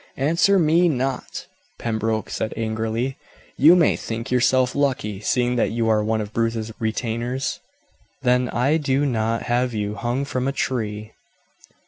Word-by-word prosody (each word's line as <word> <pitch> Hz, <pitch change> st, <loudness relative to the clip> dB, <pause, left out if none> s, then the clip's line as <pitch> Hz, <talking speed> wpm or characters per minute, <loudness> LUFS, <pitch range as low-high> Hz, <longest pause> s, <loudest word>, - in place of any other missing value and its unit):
"Answer 170 Hz, +8 st, +3 dB
me 170 Hz, +1 st, +4 dB
not," 130 Hz, -2 st, -3 dB, 0.3 s
Pembroke 110 Hz, -1 st, -2 dB
said 110 Hz, -, -3 dB
angrily. 115 Hz, +3 st, -2 dB, 0.4 s
"You 160 Hz, +6 st, +7 dB
may 170 Hz, -3 st, +4 dB
think 115 Hz, +3 st, -5 dB
yourself 130 Hz, 0 st, +3 dB
lucky, 130 Hz, -8 st, -1 dB
seeing 125 Hz, +3 st, 0 dB
that -, -, +2 dB
you 115 Hz, 0 st, 0 dB
are 105 Hz, -1 st, +3 dB
one 110 Hz, +1 st, 0 dB
of 105 Hz, 0 st, -7 dB
Bruce's 115 Hz, -1 st, -1 dB
retainers, 120 Hz, +3 st, -2 dB, 0.6 s
that 125 Hz, 0 st, +2 dB
I 135 Hz, +6 st, +2 dB
do 140 Hz, -2 st, +1 dB
not 115 Hz, -3 st, 0 dB
have 120 Hz, 0 st, 0 dB
you 105 Hz, -1 st, -2 dB
hung 120 Hz, +6 st, -2 dB
from 130 Hz, -1 st, -2 dB
a -, -, +1 dB
tree. 110 Hz, -6 st, -3 dB
120 Hz, 145 wpm, -22 LUFS, 110-135 Hz, 0.6 s, You